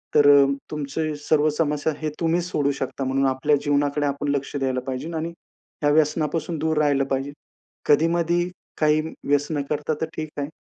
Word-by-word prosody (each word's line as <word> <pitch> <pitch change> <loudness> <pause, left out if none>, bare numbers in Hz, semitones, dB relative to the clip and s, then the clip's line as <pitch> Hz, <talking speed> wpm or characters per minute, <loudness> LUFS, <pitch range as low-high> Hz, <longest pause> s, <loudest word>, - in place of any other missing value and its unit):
तर 145 -1 +7
अ, - - +4 0.3
तुमचे 150 +1 -3
सर्व 155 0 +3
समस्या 150 0 0
हे 155 - -1
तुम्हीच 170 +1 +1
सोडू 145 -5 0
शकता. 135 +1 -3
म्हणून 135 +1 +1
आपल्या 130 +3 +2
जीवनाकडे 145 0 +1
आपण 140 +1 -2
लक्ष 140 +1 -4
द्यायला 130 -2 0
पाहिजे 130 +5 -4
आणि 165 +2 -3 0.5
या 145 - +4
व्यसनापासून 155 +2 +1
दूर 160 +1 0
राहिलं 145 -2 +3
पाहिजे. 135 +1 -2 0.5
कधी-मधी 170 +3 +2 0.3
काही 155 0 +3 0.3
व्यसन 145 +1 +1
करता 150 +1 -1
तर - - +2
ठीक 155 -1 -4
आहे. 145 0 -2
150 Hz, 165 wpm, -23 LUFS, 140-160 Hz, 0.5 s, तर